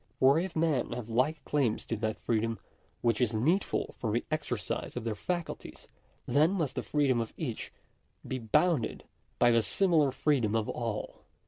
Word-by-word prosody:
For 135 +4 +6
if 180 0 -3
men 155 -7 +1
have 120 -2 -6
like 130 +7 +1
claims 135 -7 0
to 115 - -2
that 110 +1 -2
freedom 115 0 0 0.4
which 115 0 +1
is 115 -2 +2
needful 165 - +1
for 110 - -1
the 120 +3 0
exer 155 - -1
cise - - -4
of - - -3
their 115 -1 -1
faculties, 175 - -5 0.4
then 155 +6 +3
must 160 -8 -1
the 125 - -2
freedom 135 -3 +1
of 115 - -5
each 125 -9 -4 0.6
be 130 - -2
bounded 125 +5 +1 0.3
by 120 - +5
the 115 0 +4
similar 160 - +3
freedom 130 -5 +1
of 110 -1 +1
all. 115 -3 -4
125 Hz, 170 wpm, -30 LUFS, 115-155 Hz, 0.6 s, For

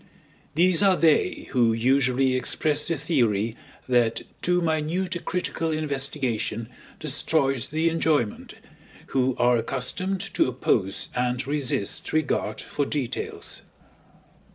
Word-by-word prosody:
These 175 +2 +4
are 195 -2 +5
they 160 -3 +2
who 120 -4 +3
usually 130 +2 +2
express 145 +4 +1
the 165 - 0
theory 115 - +1 0.3
that 120 -3 +2 0.2
too 180 0 +2
minute 170 +3 -1
a - - -2
critical 165 -2 -2
investigation 140 -7 -2 0.3
destroys 135 -3 +1
the 160 +2 0
enjoyment, 160 -8 0 0.5
who 130 -1 +1
are 120 0 +4
accustomed 135 +11 -1
to - - +3
oppose 110 -6 0
and 125 0 -1
resist 140 -7 -1
regard 155 -1 0
for 145 - -2
details. 140 -3 -3
140 Hz, 110 wpm, -25 LUFS, 125-160 Hz, 0.5 s, are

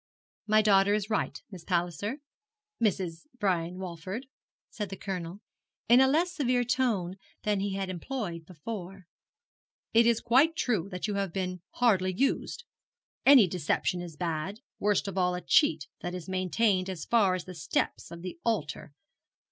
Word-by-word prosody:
'My 215 0 +5
daughter 200 -1 +5
is 210 +1 -3
right, 215 - -1
Miss 180 -4 -9
Palliser 180 - -1 0.6
Mrs. 185 - -1
Brian 180 -3 0
Walford,' 185 +6 -6 0.5
said 210 -3 -4
the 195 - -5
Colonel, 185 0 -5 0.5
in 240 +3 +7
a 265 - +6
less 330 +6 +2
severe 250 -4 +1
tone 225 -8 0 0.3
than 210 -2 +1
he 195 0 -2
had 195 -1 -2
employed 180 -3 -5
before. 190 +2 -7 0.9
'It 230 +1 +6
is 235 -1 +3
quite 270 +8 +4
true 210 - 0
that 180 -2 -4
you 210 - -2
have 200 -2 -1
been 185 -1 -3
hardly 195 -6 +3
used. 275 - 0 0.6
Any 270 -6 +9
deception 180 +1 -1
is 170 -3 -8
bad, 175 - -3 0.2
worst 205 -1 +1
of 195 -1 -2
all 180 0 +2
a 180 - -4
cheat 155 -4 +3
that 175 +1 -4
is 180 -3 -7
maintained 185 +1 +1
as 175 -5 -5
far 205 -6 +3
as 180 - -5
the 185 - -8
steps 160 -4 -2
of 170 0 -9
the 180 -2 -6
altar. 150 -9 -2
190 Hz, 160 wpm, -29 LUFS, 180-220 Hz, 0.9 s, Any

